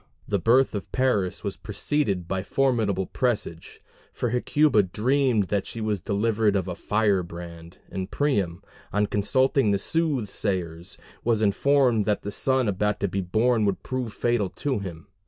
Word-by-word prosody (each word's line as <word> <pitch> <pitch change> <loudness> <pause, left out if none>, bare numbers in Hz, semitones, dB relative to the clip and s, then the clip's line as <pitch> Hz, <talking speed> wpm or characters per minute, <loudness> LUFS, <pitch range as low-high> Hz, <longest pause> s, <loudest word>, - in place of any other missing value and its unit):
The 100 - 0
birth 125 +9 +3
of 100 -2 -5
Paris 115 -8 0
was - - -4
preceded 100 - -1
by 95 0 -1
formidable 110 -5 +1
presage; 105 -10 -3 0.3
for 120 - -2
Hecuba 125 0 +3
dreamed 120 +4 +1
that 100 -2 -1
she 115 - -7
was 110 -2 -1
delivered 105 +1 +1
of 95 -1 0
a 90 - -3
firebrand, 85 -5 -2
and 95 0 -5
Priam, 100 - 0 0.3
on 105 0 +2
consulting 130 +4 +2
the 100 - +3
soothsayers, 100 - -2 0.3
was 115 -2 +1
informed 120 +1 +3
that 105 -2 0
the 105 - -4
son 130 +2 +1
about 105 +1 0
to 100 - +2
be 95 +1 -2
born 110 +5 +2
would 100 -2 -1
prove 130 -3 -3
fatal 120 -3 0
to 135 +1 -2
him. 85 -5 -7
105 Hz, 155 wpm, -25 LUFS, 95-125 Hz, 0.3 s, birth